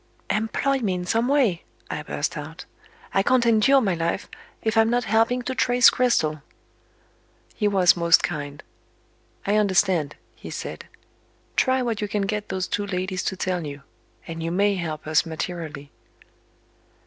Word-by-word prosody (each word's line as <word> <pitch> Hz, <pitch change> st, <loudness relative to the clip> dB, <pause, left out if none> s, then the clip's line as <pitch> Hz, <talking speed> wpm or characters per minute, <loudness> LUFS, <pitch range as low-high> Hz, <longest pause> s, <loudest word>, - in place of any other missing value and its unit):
"Employ 225 Hz, +5 st, 0 dB
me 200 Hz, -7 st, -1 dB
in 180 Hz, 0 st, -4 dB
some 230 Hz, +5 st, +1 dB
way!" 255 Hz, -11 st, +2 dB, 0.2 s
I -, -, -4 dB
burst -, -, -3 dB
out. -, -, -8 dB, 0.5 s
"I 195 Hz, -, +3 dB
can't 245 Hz, +3 st, +3 dB
endure 235 Hz, +4 st, +5 dB
my 195 Hz, -6 st, +1 dB
life, 165 Hz, +3 st, -2 dB, 0.4 s
if 220 Hz, 0 st, 0 dB
I'm 225 Hz, 0 st, +4 dB
not 245 Hz, +1 st, +1 dB
helping 230 Hz, +3 st, +2 dB
to 260 Hz, -, -3 dB
trace 245 Hz, -1 st, +5 dB
Cristel." 155 Hz, -, +1 dB, 1.1 s
He 210 Hz, -, +1 dB
was 190 Hz, -3 st, +4 dB
most 170 Hz, 0 st, +4 dB
kind. 145 Hz, -2 st, -4 dB, 0.8 s
"I 205 Hz, +1 st, +2 dB
understand," 190 Hz, -7 st, +2 dB, 0.2 s
he -, -, -10 dB
said. -, -, -6 dB, 0.7 s
"Try 260 Hz, -1 st, +2 dB
what 230 Hz, -3 st, -2 dB
you 210 Hz, -, -1 dB
can 205 Hz, 0 st, -1 dB
get 210 Hz, +1 st, -3 dB
those 185 Hz, -1 st, -2 dB
two 205 Hz, 0 st, -2 dB
ladies 185 Hz, 0 st, -2 dB
to 190 Hz, -, -2 dB
tell 180 Hz, -2 st, -2 dB
you 140 Hz, -2 st, -7 dB, 0.4 s
and 165 Hz, 0 st, -6 dB
you 165 Hz, -, -2 dB
may 200 Hz, +4 st, +2 dB
help 160 Hz, -5 st, -4 dB
us 155 Hz, 0 st, +3 dB
materially." 160 Hz, -3 st, -6 dB
195 Hz, 160 wpm, -24 LUFS, 170-225 Hz, 1.1 s, endure